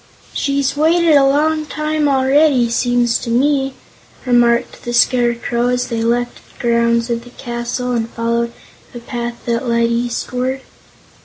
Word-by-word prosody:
"She's 280 -1 -1
waited 325 +2 +3
a 280 - +6
long 305 +2 +1
time 305 0 -1
already, 270 -2 +3
seems 240 -1 +1
to 240 - -6
me," 270 +2 +1 0.5
remarked 240 -1 +2
the 240 - -4
Scarecrow, 240 -1 +1
as 250 0 -1
they 230 -1 -2
left 240 +1 -1
the - - -25
grounds 235 0 +1
of 235 0 -2
the 245 - -13
castle 240 0 -4
and 230 -2 -1
followed 235 0 -1 0.4
a - - -5
path 240 -1 -6
that 235 +1 -1
led 235 0 +1
eastward. 250 +2 -2
245 Hz, 145 wpm, -17 LUFS, 235-270 Hz, 0.5 s, a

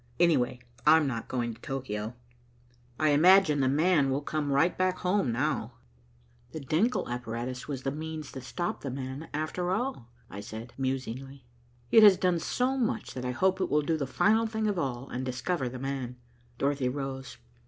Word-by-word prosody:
Anyway, 135 -8 +3 0.3
I'm 160 -1 +7
not 120 -5 -3
going 120 -2 -2
to - - -17
Tokio. 120 -4 -4 0.8
I 155 - +3
imagine 160 +1 +6
'the 135 - +3
man' 150 0 +3
will 135 +2 -1
come 150 -1 -2
right 140 +6 +3
back 185 0 +1
home 180 - +1
now." 125 -2 -1 0.8
"The 160 - -4
Denckel 165 - +1
apparatus 120 +1 -4
was 135 -3 -4
the 135 - -1
means 155 0 -6
that 130 - -7
stopped 175 +7 -3
'the 140 - -4
man,' 130 +3 -6
after 155 +4 -2
all," 200 - -2 0.2
I 100 - -8
said 110 +3 -8
musingly. 135 0 -4 0.5
"It 225 - +8
has 205 -3 +8
done 180 -2 +2
so 255 +8 0
much, 225 -2 -1
that 125 -1 -5
I - - -1
hope 190 +9 +1
it 185 - 0
will 150 0 +2
do 160 +2 +1
the 140 -4 -2
final 220 - +3
thing 220 0 -2
of 205 -4 0
all, 130 -3 -3
and 125 - -4
discover 130 +2 -2
'the 130 - -7
man.'" 130 -2 -4 0.4
Dorothy 140 -1 0
rose. 135 -1 -5
140 Hz, 180 wpm, -29 LUFS, 130-175 Hz, 0.8 s, It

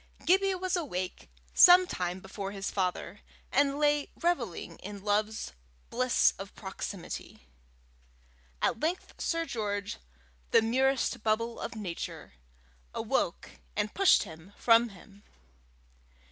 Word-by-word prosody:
Gibbie 385 +2 +4
was 370 0 -1
awake 185 - -4 0.2
some 360 +1 +9
time 180 - -3
before 195 +1 -6
his 195 0 -4
father, 185 0 -2 0.3
and 280 +1 +3
lay 295 -1 +2
revelling 265 - -1
in 200 0 -8
love's 210 - 0 0.4
bliss 255 +1 +3
of 195 0 -8
proximity. 190 - -7 1.2
At - - +2
length 335 +6 -3
Sir 330 0 0
George, 205 -6 -3 0.5
the - - +5
merest 260 +1 +1
bubble 230 +2 0
of - - -5
nature, 185 - -6 0.6
awoke, - - -1 0.2
and 210 - -1
pushed 390 -1 +5
him 160 +5 -12
from 230 0 +5
him. 200 +1 -16
220 Hz, 115 wpm, -30 LUFS, 195-285 Hz, 1.2 s, some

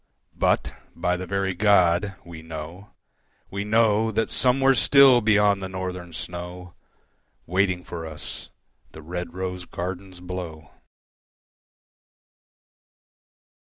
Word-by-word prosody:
But, - - +1 0.2
by 90 0 0
the 90 +1 -6
very 100 -1 -1
God, 95 -1 +3
we 85 -2 -9
know, 80 +5 -8 0.6
we 100 +1 -3
know 110 0 +3
That 110 +1 -1
somewhere 135 +1 +3
still, 135 -1 +6
beyond 105 -2 +3
the 95 - -4
Northern 90 -2 -5
snow 90 +2 -7 0.7
Waiting 90 0 +1
for 80 -2 -6
us 80 -1 -7 0.4
the 80 - -11
red 90 +1 -5
rose 90 -1 -4
gardens 90 +1 -6
blow. 90 -4 -7
90 Hz, 105 wpm, -24 LUFS, 85-105 Hz, 0.7 s, still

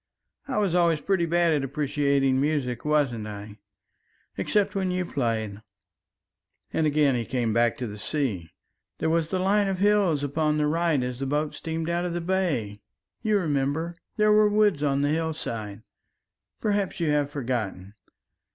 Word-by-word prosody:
"I 265 - -2
was 200 -5 +1
always 170 -3 +3
pretty 185 -2 0
bad 170 0 +3
at 145 -2 +1
appreciating 140 -1 +1
music, 140 -5 -1
wasn't 140 -8 +1
I? 105 0 -8 0.8
except 205 -2 +1
when 190 -2 -1
you 180 0 -1
played," 110 -8 -2 1.1
and 160 - +2
again 145 -2 +3
he 120 -2 0
came 120 -2 -1
back 120 +3 +2
to 130 - -3
the 105 -2 -7
sea. 105 - -2 0.5
"There 160 - 0
was 165 -1 +1
the 190 - 0
line 200 +2 +2
of 190 -1 -1
hills 195 -7 +3
upon 150 +2 0
the 150 - +2
right 160 -3 +1
as 125 0 -4
the 135 - -2
boat 150 +2 -1
steamed 160 +2 -4
out 170 +1 0
of 175 - -2
the - - 0
bay 165 - -1 0.4
you 215 -2 +2
remember 155 0 -1 0.2
there 215 0 +4
were 210 0 +5
woods 210 -7 +3
on 140 -1 +1
the 145 - +2
hillside 120 -10 -3 0.8
perhaps 200 -3 -1
you 165 -3 +1
have 145 -1 +1
forgotten. 115 -9 -3
150 Hz, 165 wpm, -26 LUFS, 125-175 Hz, 1.1 s, were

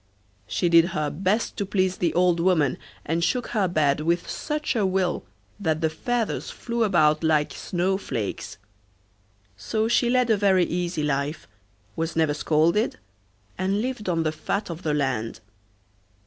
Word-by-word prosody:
She 175 - 0
did 170 -1 +6
her 150 -1 0
best 195 +7 -1
to 205 - 0
please 185 -2 +1
the 170 -2 +1
old 175 -1 +3
woman, 165 -6 +2 0.3
and 165 +2 0
shook 245 +6 0
her 210 -5 +1
bed 150 -5 +2
with 170 +2 0
such 300 -3 -2
a 220 - +2
will 185 -2 0 0.3
that 160 -5 0
the 160 -1 +1
feathers 240 +6 -2
flew 235 -1 -2
about 155 -6 +3
like 155 -2 +2
snow 190 +2 -1
flakes; 110 - -4 1.0
so 215 - -1
she 235 +1 +2
led 250 -1 +3
a 215 - +4
very 190 -3 +3
easy 175 -2 -2
life, 145 +2 -2 0.5
was 165 0 -2
never 160 -2 +2
scolded, 160 +7 +1 0.6
and 190 +2 +1
lived 245 -6 -3
on 165 -2 +1
the 155 - 0
fat 170 +5 -3
of 165 +1 -7
the 150 -4 0
land. 125 -6 -1
175 Hz, 160 wpm, -25 LUFS, 155-200 Hz, 1.0 s, did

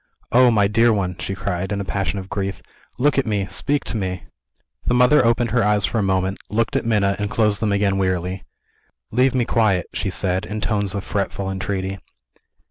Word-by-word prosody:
"Oh, 125 +1 +6
my 105 -4 +3
dear 115 +3 +4
one!" 95 -4 -1
she 95 - -3
cried, 95 0 -3
in 100 - -1
a 100 - -3
passion 100 +1 -2
of 95 -1 -6
grief, 100 -1 -4 0.3
"look 140 +2 +2
at 135 - 0
me! 100 -3 0
speak 145 +9 0
to 115 - -3
me!" 95 -3 -3 0.6
The 125 - +1
mother 125 +3 +5
opened 115 -1 +2
her 120 -1 +2
eyes 105 -1 +3
for 115 - -1
a - - +2
moment 95 0 0
looked 110 +2 0
at - - 0
Minna 100 -3 +2
and 105 0 -2
closed 105 -2 +1
them 110 -2 0
again 100 -1 +1
wearily. 95 0 -1 0.7
"Leave 130 +3 +2
me 125 -2 +2
quiet," 100 -8 +2
she - - -2
said, 95 +2 -1
in 105 +1 -5
tones 105 -2 -1
of 100 - -3
fretful 100 -2 -2
entreaty. 95 0 -3
100 Hz, 205 wpm, -21 LUFS, 95-115 Hz, 0.7 s, Oh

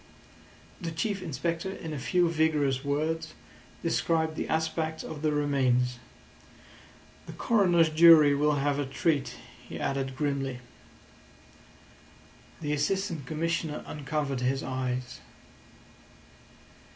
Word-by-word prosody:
The 170 - -3
Chief 195 +5 -2
Inspector 165 +3 -3
in 165 -5 -6
a 145 - -4
few 175 +6 +2
vigorous 150 -5 +1
words 155 +3 -2 0.5
described 160 -1 +1
the - - -4
aspect 160 0 -1
of 150 -2 -7
the 155 -1 +1
remains. 130 -4 +1 1.3
"The - - -8
coroner's 180 -8 +3
jury 155 -2 +7
will 150 +1 +2
have 145 0 0
a 145 - 0
treat," 140 +1 0 0.3
he - - -6
added 135 -1 -2
grimly. 135 -2 -2 2.0
The 150 -1 -1
Assistant 165 -1 -1
Commissioner 160 0 -2
uncovered 145 -3 -3
his 135 +2 0
eyes. 130 -1 -3
150 Hz, 105 wpm, -28 LUFS, 140-165 Hz, 2.0 s, jury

